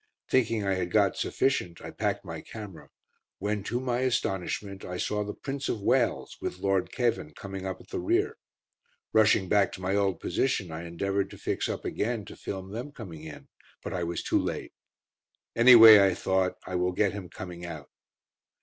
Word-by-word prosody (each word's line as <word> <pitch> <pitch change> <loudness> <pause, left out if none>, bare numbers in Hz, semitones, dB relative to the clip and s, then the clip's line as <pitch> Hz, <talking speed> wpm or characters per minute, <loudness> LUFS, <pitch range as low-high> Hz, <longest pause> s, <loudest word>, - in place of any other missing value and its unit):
Thinking 115 -5 +2
I 95 - +2
had 90 -2 -2
got 100 -4 +3
sufficient 90 -10 0
I - - -8
packed - - -2
my - - -6
camera, 105 -6 -10 0.5
when, 105 -1 -2
to 120 - -1
my 125 -1 -1
astonishment, 100 -5 -2
I 90 0 -5
saw 105 +3 -1
the 105 0 -6
Prince 140 0 -4
of 110 - -1
Wales, 120 +4 +1
with - - -4
Lord 95 0 0
Cavan, 115 - -1
coming 95 -1 -6
up 95 - -4
at - - -17
the 385 - -3
rear. 380 +6 0 0.7
Rushing 110 -3 +4
back 100 +1 +3
to 95 - -8
my 95 +2 0
old 100 -2 +1
position, 100 -3 -1
I 80 +2 -6
endeavoured 100 +3 -1
to - - -11
fix - - -2
up - - -4
again, 110 -1 -2
to - - -10
film 95 0 -6
them 120 +7 -5
coming 95 - -9
in, 80 -1 -10 0.3
but - - -5
I 90 -2 -2
was 85 0 -3
too - - +2
late. - - -4 0.8
"Anyway," 115 -3 +10
I 95 -2 +3
thought, 95 0 0
"I 95 - -7
will 90 0 +1
get 100 +1 +1
him 95 -4 -7
coming 90 -2 -8
out." 80 -5 -8
100 Hz, 185 wpm, -28 LUFS, 90-115 Hz, 0.8 s, Anyway